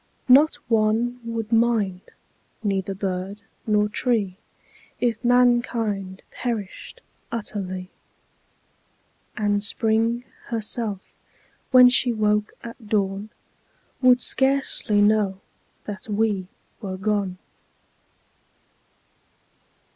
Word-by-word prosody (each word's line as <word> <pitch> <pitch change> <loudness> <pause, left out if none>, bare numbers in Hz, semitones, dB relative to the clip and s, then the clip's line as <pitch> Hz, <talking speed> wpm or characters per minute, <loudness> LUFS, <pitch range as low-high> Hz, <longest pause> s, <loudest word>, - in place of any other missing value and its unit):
Not 280 +5 +6
one 225 +2 +1
would 230 -1 -4
mind, 225 -5 +2 0.6
neither 195 -1 -1
bird 195 +1 -4 0.2
nor 210 -1 +3
tree 210 -4 0 0.6
If 235 -1 -1
mankind 240 -6 +1
perished 235 - -5 0.3
utterly; 190 -5 -5 1.5
And 205 -1 +1
Spring 225 +3 0 0.2
herself, 220 -3 -3 0.6
when 250 -1 +8
she 250 0 +3
woke 210 -1 0
at 230 -1 -10
dawn, 200 0 -1 0.7
Would 250 -1 +5
scarcely 265 -6 +2
know 205 -2 +2 0.5
that 210 +1 -7
we 205 -3 0 0.3
were 190 -3 -5
gone. 200 -2 -1
215 Hz, 80 wpm, -23 LUFS, 200-235 Hz, 1.5 s, when